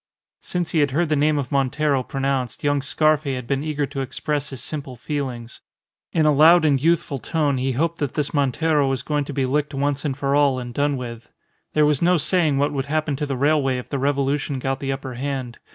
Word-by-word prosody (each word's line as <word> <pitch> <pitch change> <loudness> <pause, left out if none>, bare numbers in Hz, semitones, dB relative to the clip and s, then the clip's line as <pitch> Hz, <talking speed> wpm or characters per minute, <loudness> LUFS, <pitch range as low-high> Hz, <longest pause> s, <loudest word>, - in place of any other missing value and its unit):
Since 175 -2 -3
he 160 - +2
had 145 -1 +3
heard 155 +4 0
the 155 - +2
name 150 +1 +2
of 135 -3 -3
Montero 140 0 +1
pronounced, 135 -1 -2
young 145 -1 +2
Scarfe 155 +2 +2
had 125 -1 -5
been 135 +3 -1
eager 150 -2 -1
to 135 0 -5
express 145 +2 -2
his 135 - -6
simple 140 -4 -4
feelings. 125 -3 -5 0.5
In 160 -2 +2
a 150 - +5
loud 160 +3 +6
and 140 -3 +3
youthful 160 -3 +1
tone 145 -1 0
he 130 +1 0
hoped 165 +6 -1
that 145 -4 -2
this 150 -2 -1
Montero 145 +1 +2
was 130 -2 -2
going 145 0 -1
to 145 - -6
be 135 -1 0
licked 145 +2 -1
once 140 0 0
for 140 0 -1
all 140 -2 +3
and 120 -1 -6
done 145 +1 0
with. 115 -2 -8 0.4
There 150 -1 +4
was 150 -2 +2
no 180 +1 +4
saying 160 -2 +2
what 145 +2 +1
would 135 -1 -2
happen 155 0 -1
to 150 0 -2
the 135 -2 -2
railway 140 -1 +2
if 125 - -7
the 140 - -2
revolution 140 0 0
got 135 +1 -2
the 135 -1 -2
upper 135 -1 -5
hand. 130 -1 -4
140 Hz, 220 wpm, -22 LUFS, 135-150 Hz, 0.5 s, loud